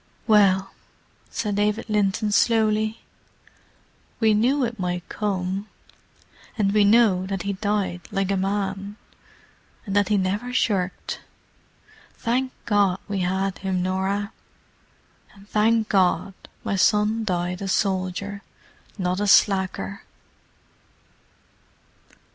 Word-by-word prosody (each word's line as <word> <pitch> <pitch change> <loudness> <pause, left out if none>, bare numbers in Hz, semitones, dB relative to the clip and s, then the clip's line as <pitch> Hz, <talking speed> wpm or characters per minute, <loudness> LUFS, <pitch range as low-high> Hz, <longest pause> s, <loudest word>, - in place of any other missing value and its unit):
"Well," 195 -3 +4 0.6
said 205 -2 -2
David 210 +2 0
Linton 210 0 +1
slowly, 220 0 +2 1.2
"we 220 -2 +4
knew 250 +6 +2
it 230 -2 -6
might 180 -1 -3
come. 195 -1 -2 0.9
And 200 -2 +1
we 210 -1 +5
know 200 -3 +4
that 195 -2 -3
he 200 - -2
died 200 -3 -1
like 195 0 -1
a - - +2
man, 195 +1 -2 0.9
and 195 -2 -4
that 205 -1 +3
he 210 - +3
never 200 +6 -1
shirked. 195 -7 -1 1.0
Thank 255 +2 -1
God 200 -4 +2
we 200 -1 -2
had 190 +1 -1
him, 190 -2 -1
Norah. 195 +3 -1 1.0
And 200 0 -17
thank 220 +1 +2
God 190 -1 +2 0.3
my - - -1
son 210 +3 +2
died 180 -2 -2
a 195 - -3
soldier, 195 +1 -1 0.6
not 180 -1 -1
a 205 - 0
slacker." 190 - +2
200 Hz, 110 wpm, -24 LUFS, 190-210 Hz, 1.2 s, we